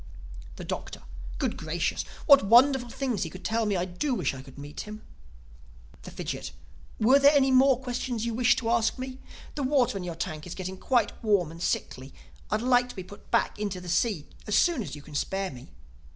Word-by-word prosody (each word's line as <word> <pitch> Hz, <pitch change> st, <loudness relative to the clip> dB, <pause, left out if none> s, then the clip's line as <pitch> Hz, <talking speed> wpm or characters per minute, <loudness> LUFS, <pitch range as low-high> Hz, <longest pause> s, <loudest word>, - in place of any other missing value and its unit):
The -, -, -8 dB
Doctor: -, -, -6 dB, 0.3 s
"Good -, -, -1 dB
Gracious, -, -, -1 dB, 0.2 s
what 280 Hz, -3 st, +8 dB
wonderful 245 Hz, +4 st, +5 dB
things 250 Hz, -4 st, -2 dB
he 165 Hz, -, -1 dB
could 185 Hz, +3 st, -11 dB
tell 225 Hz, 0 st, +1 dB
me! 205 Hz, -, +1 dB
I 175 Hz, 0 st, 0 dB
do 215 Hz, +10 st, -2 dB
wish -, -, -1 dB
I 130 Hz, -, -8 dB
could 135 Hz, 0 st, -15 dB
meet 145 Hz, +1 st, -9 dB
him." 215 Hz, 0 st, -7 dB, 1.0 s
The -, -, -9 dB
Fidgit: -, -, -5 dB, 0.5 s
"Were 255 Hz, +6 st, +6 dB
there 285 Hz, +1 st, +6 dB
any 270 Hz, -1 st, +4 dB
more 260 Hz, -1 st, +5 dB
questions 245 Hz, -2 st, -3 dB
you 235 Hz, -, -2 dB
wished 245 Hz, +1 st, +3 dB
to 230 Hz, -2 st, -1 dB
ask 235 Hz, +1 st, +2 dB
me? 260 Hz, 0 st, -6 dB, 0.3 s
This 285 Hz, -, -3 dB
water 260 Hz, -7 st, +2 dB
in -, -, -6 dB
your 175 Hz, -2 st, -5 dB
tank 155 Hz, -2 st, -5 dB
is 175 Hz, -, -6 dB
getting 185 Hz, 0 st, -5 dB
quite 240 Hz, -5 st, +1 dB
warm 200 Hz, -7 st, +2 dB
and 165 Hz, +1 st, -11 dB
sickly. 130 Hz, -5 st, -3 dB, 0.3 s
I'd 215 Hz, +2 st, 0 dB
like 245 Hz, 0 st, +3 dB
to -, -, -9 dB
be 185 Hz, -, -6 dB
put 200 Hz, +3 st, -14 dB
back -, -, +1 dB
into 200 Hz, -3 st, -3 dB
the 180 Hz, 0 st, -9 dB
sea 180 Hz, -2 st, +1 dB, 0.2 s
as 210 Hz, -, +1 dB
soon 345 Hz, -8 st, +3 dB
as 195 Hz, -, -6 dB
you 145 Hz, -, -11 dB
can 155 Hz, -, -13 dB
spare 195 Hz, +6 st, -2 dB
me." 125 Hz, -2 st, -12 dB
220 Hz, 210 wpm, -27 LUFS, 180-255 Hz, 1.0 s, what